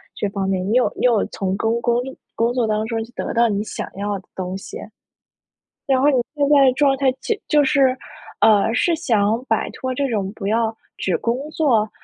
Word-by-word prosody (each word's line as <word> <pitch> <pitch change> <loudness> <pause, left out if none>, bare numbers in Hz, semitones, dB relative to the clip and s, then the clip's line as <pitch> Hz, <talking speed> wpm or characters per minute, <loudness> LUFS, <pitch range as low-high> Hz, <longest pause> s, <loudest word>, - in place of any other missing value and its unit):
这 205 - -2
方 195 -1 -3
面。 190 -1 -1
你 205 - -1
有 250 +1 +3
你 - - -1
有 235 -4 +3
从 190 -1 -3
工 230 +2 0
工 240 0 +1
力 265 +1 -8 0.2
工 230 +1 0
作 245 -2 +1
当 215 0 0
中 230 0 -2 0.2
得 - - -3
到 235 0 +3
你 205 -1 -1
想 - - -6
要 205 +1 -2
的 185 - -20
东 185 0 -4
西。 195 - -9 1.1
然 265 -2 +2
后 280 - +4
你 295 - +3 0.2
现 285 -1 +2
在 285 -2 +6
的 260 - +5
状 275 -1 +3
态 270 -1 +2
就 450 - -1
就 300 -1 +4
是 265 -2 +3 0.4
呃， 215 0 +4
是 335 +8 +2
想 225 -5 +1
摆 - - +1
脱 260 0 -4
这 275 +2 -1
种 200 -5 -2
不 210 -2 -7
要 225 +1 +1 0.2
只 180 -3 -1
工 255 +6 -2
作？ 235 -10 +1
230 Hz, 230 characters per minute, -21 LUFS, 205-265 Hz, 1.1 s, 在